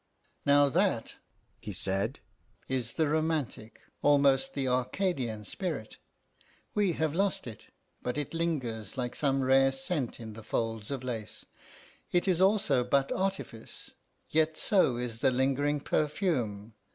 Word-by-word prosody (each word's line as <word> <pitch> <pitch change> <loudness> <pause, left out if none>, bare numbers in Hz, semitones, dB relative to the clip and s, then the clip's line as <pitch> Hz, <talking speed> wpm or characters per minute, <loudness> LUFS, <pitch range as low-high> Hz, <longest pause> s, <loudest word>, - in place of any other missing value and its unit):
"Now 145 0 +6
that," 170 - 0 0.4
he 105 - -6
said, 100 - +2 0.5
"is 125 -3 -2
the 160 -2 +1
romantic, 155 -7 -2 0.2
almost 140 -2 +3
the 135 -2 -1
Arcadian 125 - -1
spirit. 145 - -4 0.8
We 200 -4 +2
have 160 -2 0
lost 195 +3 0
it, 115 -4 -9 0.3
but 125 +2 -3
it 150 +1 -3
lingers 130 - -2
like 125 -1 -2
some 135 -2 +1
rare 135 +1 +5
scent 135 -1 -3
in 110 -2 -7
the 110 - -9
folds 115 -1 -2
of 135 -2 -4
lace. 115 -4 -5 0.7
It 175 +2 +2
is 180 -2 +2
also 190 -10 +3
but 135 +2 +1
artifice, 190 -12 -4 0.4
yet 155 0 +1
so 180 - +3
is 120 -2 -4
the 135 +1 +4
lingering 135 +3 +1
perfume. 135 - -1
135 Hz, 135 wpm, -30 LUFS, 120-160 Hz, 0.8 s, Now